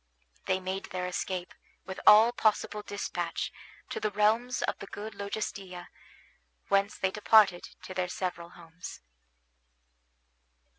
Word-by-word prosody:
They 190 0 +2
made 190 +1 -4
their 185 0 -4
escape, 180 0 -3 0.3
with 190 0 -6
all 215 +3 +9
possible 215 -2 +1
despatch, 205 0 -3 0.4
to - - -2
the 215 - 0
realms 220 +4 +2
of - - -1
the 200 - -8
good 215 +2 -7
Logestilla, 200 -3 -5 0.8
whence 200 +1 +2
they 190 - 0
departed 210 -3 +4
to 185 - -7
their 185 -1 -1
several 175 -2 -4
homes. 170 0 -10
195 Hz, 120 wpm, -30 LUFS, 180-210 Hz, 0.8 s, all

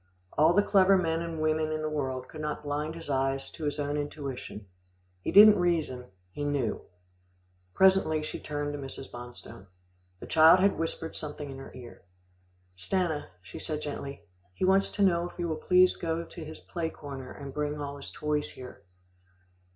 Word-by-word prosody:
All 155 +3 +5
the 205 +2 +4
clever 195 -1 +5
men 165 -2 0
and 165 -1 -4
women 155 0 +1
in 155 0 -2
the - - 0
world 130 -4 -3
could 155 - -9
not 150 0 -3
blind 150 +2 -2
his 165 -1 -8
eyes 135 -1 -1
to 160 - -6
his 145 0 -1
own 145 0 -1
intuition. 140 -7 -5 0.6
He - - -2
didn't 210 0 +9
reason, 155 -8 0 0.2
he 145 - -5
knew. 140 -6 -1 0.9
Presently 190 -5 +4
she - - -5
turned 145 0 -3
to 145 - -5
Mrs. 135 0 -8
Bonstone. 120 -5 -10 0.5
The - - -8
child 160 +3 +7
had 195 -1 +3
whispered 165 0 -3
something 145 -2 -5
in 135 - -8
her 135 - -10
ear. 125 -2 -11 0.7
"Stanna," 160 - -1 0.2
she 95 - -9
said 155 -2 -4
gently, 140 -1 -6 0.3
"he - - 0
wants 195 +1 +4
to 205 - +1
know 175 -2 +3
if - - -17
you 175 -1 -1
will 160 - -1
please 180 +3 +4
go 165 0 -2
to 170 0 -9
his 155 +1 -9
play 165 -2 -4
corner 135 -4 -8
and 140 -1 -8
bring 150 0 -2
all 140 -1 -5
his 140 - -8
toys 150 -1 -2
here." 125 -1 -11
150 Hz, 180 wpm, -29 LUFS, 140-165 Hz, 0.9 s, didn't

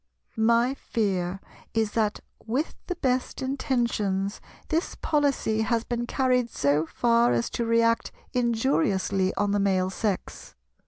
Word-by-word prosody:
My 235 +3 +3
fear 195 -8 -2 0.4
is 220 -2 +1
that, 215 -2 0 0.3
with 265 +8 -1
the 360 - -2
best 255 -6 -1
intentions, 235 -7 -1 0.3
this 325 +2 -1
policy 280 -8 +1
has 230 0 +1
been 240 0 -3
carried 250 -2 +1
so 145 0 +1
far 235 - +3
as 115 -1 0
to 235 - -1
react 230 0 +2 0.2
injuriously 225 - +1
on 205 0 +1
the 205 - +2
Male 190 -2 +1
Sex. 200 -1 -3
230 Hz, 125 wpm, -26 LUFS, 200-250 Hz, 0.4 s, My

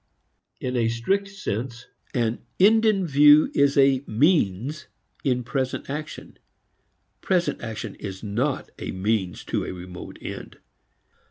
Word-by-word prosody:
In 125 0 -3
a 115 -2 +2
strict 190 +14 0
sense 120 - -5 0.3
an 115 -2 0 0.2
end 220 +4 +5
in 195 -4 +2
view 150 0 +6
is 140 0 +3
a 135 -1 +4
means 140 - +1 0.4
in 125 -2 +1
present 130 +1 -3
action; 150 +1 -7 0.8
present 180 -2 0
action 115 -2 -5
is 95 0 -8
not 120 +7 -2
a - - -5
means 95 -1 -1
to - - -2
a - - -5
remote 90 0 -9
end. - - -8
130 Hz, 125 wpm, -24 LUFS, 110-150 Hz, 0.8 s, view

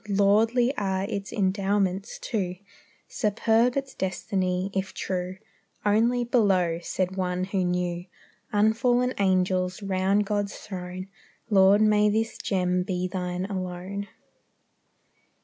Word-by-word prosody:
Lordly 220 +6 +3
are 190 -2 0
its 200 -1 -4
endowments, 195 0 0
too; 190 -7 -2 0.5
Superb 225 +3 +1
its 270 -1 -3
destiny, 185 0 -1
if 190 0 -3
true; 185 0 -3 0.5
Only 230 +4 +3
below, 190 -8 +2
said 185 +1 -2
one 180 -1 -1
who 190 0 -1
knew, 180 -1 -1 0.5
Unfallen 240 +4 +2
angels 185 0 +1
round 195 +1 +1
God's 205 0 -2
throne. 185 -1 -7 0.4
Lord, 200 +1 +6
may 210 -1 +4
this 225 +2 -1
gem 180 -2 0
be 180 -1 -2
Thine 180 0 -3
alone. 190 +1 -4
195 Hz, 110 wpm, -26 LUFS, 185-210 Hz, 0.5 s, Lord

